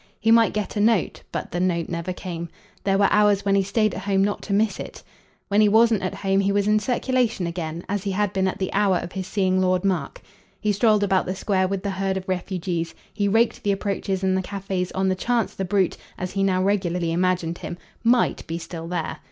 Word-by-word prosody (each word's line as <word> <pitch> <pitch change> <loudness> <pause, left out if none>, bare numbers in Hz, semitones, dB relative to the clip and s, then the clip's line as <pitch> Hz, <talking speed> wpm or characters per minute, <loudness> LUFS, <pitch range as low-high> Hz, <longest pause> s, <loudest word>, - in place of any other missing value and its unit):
He 225 +1 +2
might 230 -1 +6
get 210 -2 -3
a - - -1
note, 215 -2 +2
but - - -4
the 175 - -2
note 175 -2 0
never 170 +1 -3
came; 170 -2 -6 0.4
there 195 -1 +3
were 200 0 +4
hours 205 -1 +3
when 200 - +2
he 200 - +4
stayed 210 +2 +1
at - - -5
home 195 -1 +1
not 205 +1 -1
to - - -7
miss 210 +1 +1
it. - - -8 0.4
When 205 +1 +3
he 210 - +5
wasn't 220 -1 +4
at 185 - -3
home 195 0 +1
he 200 0 +2
was 200 0 +1
in 215 0 +4
circulation 245 -3 0
again 170 -1 -4
as 205 0 -1
he 200 - -2
had 200 0 0
been 190 0 +1
at 185 - -2
the 190 - -3
hour 195 -2 +3
of 175 - -5
his 190 -1 -5
seeing 185 -2 +1
Lord 185 0 +1
Mark. 175 -8 -1 0.4
He 210 - +1
strolled 210 0 +3
about 190 -2 +2
the 185 - -2
Square 190 -1 +1
with 195 0 -3
the 200 - -1
herd 190 0 -1
of 190 - -6
refugees; 180 -2 -3 0.2
he 205 -1 0
raked 225 +3 +2
the 205 - +1
approaches 195 -1 -2
and 190 0 +2
the 190 - +1
cafes 190 -1 -3
on 190 0 0
the 190 - +2
chance 230 +4 0
the 190 - -3
brute, 190 -1 +1 0.2
as 185 0 -4
he 195 - -2
now 185 -1 +2
regularly 180 -4 0
imaged 175 -1 0
him, 175 - -6 0.3
MIGHT 240 +1 +2
be 165 - -3
still 165 -1 -7
there. 170 -2 -3
195 Hz, 235 wpm, -23 LUFS, 185-205 Hz, 0.4 s, might